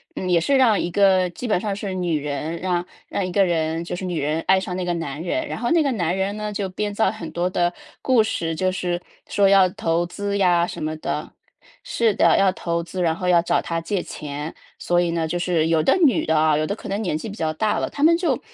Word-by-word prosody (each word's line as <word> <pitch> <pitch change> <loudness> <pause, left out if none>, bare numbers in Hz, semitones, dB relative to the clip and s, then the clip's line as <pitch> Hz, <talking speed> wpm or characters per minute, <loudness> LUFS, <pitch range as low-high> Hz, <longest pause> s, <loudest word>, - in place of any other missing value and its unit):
嗯 185 - -3
也 170 -1 +4
是 275 +11 +1
让 230 -6 +4
一 175 - -2
个 190 -2 +4
基 245 +7 -6
本 210 - +2
上 200 -1 -2
是 200 -2 -5
女 175 -4 0
人 150 +3 -4
让 180 -1 -1 0.2
让 195 - -2
一 180 - -4
个 195 +1 +3
人 165 -1 0
就 175 - -5
是 185 - -5
女 170 -4 -2
人 155 +3 -1
爱 190 0 +4
上 185 -1 -4
那 180 - -2
个 175 - 0
男 160 -1 -5
人， 320 - -2
然 - - -5
后 240 +1 -1
那 335 -1 +4
个 280 -3 +1
男 175 -3 0
人 195 +2 -2
呢， 210 0 -4
就 195 -1 -2
编 205 +2 -3
造 205 -2 +2
很 185 -6 -7
多 175 +1 -1
的 175 -1 0 0.3
故 255 -4 +4
事， 165 -7 -2
就 185 +2 0
是 180 -1 -2 0.3
说 200 -1 +3
要 195 -2 +6
投 170 -1 -1
资 200 +3 -3
呀 175 -2 +3
什 - - -6
么 155 0 -2
的 - - -4 0.5
是 225 -3 +1
的， - - +4
要 195 -1 +4
投 170 -2 -2
资， 180 +2 -5
然 165 -2 +1
后 180 +1 -4
要 175 -1 +5
找 170 - +1
她 165 0 -3
借 180 +2 -2
钱。 150 +1 -6 0.2
所 175 0 +1
以 175 - 0
呢， 165 -1 -1
就 175 +2 -2
是 170 -3 +1
有 165 -1 +3
的 160 - +3
女 255 - +2
的 160 -1 +2
啊， 155 -1 +3
有 155 +1 0
的 200 - -2
可 220 - -10
能 200 +2 -2
年 175 -7 -1
纪 190 - -6
比 205 - -7
较 160 -4 -1
大 210 +7 0
了， - - -2
她 285 - -4
们 335 +2 +6
就， 335 -7 0
180 Hz, 280 characters per minute, -22 LUFS, 165-200 Hz, 0.5 s, 要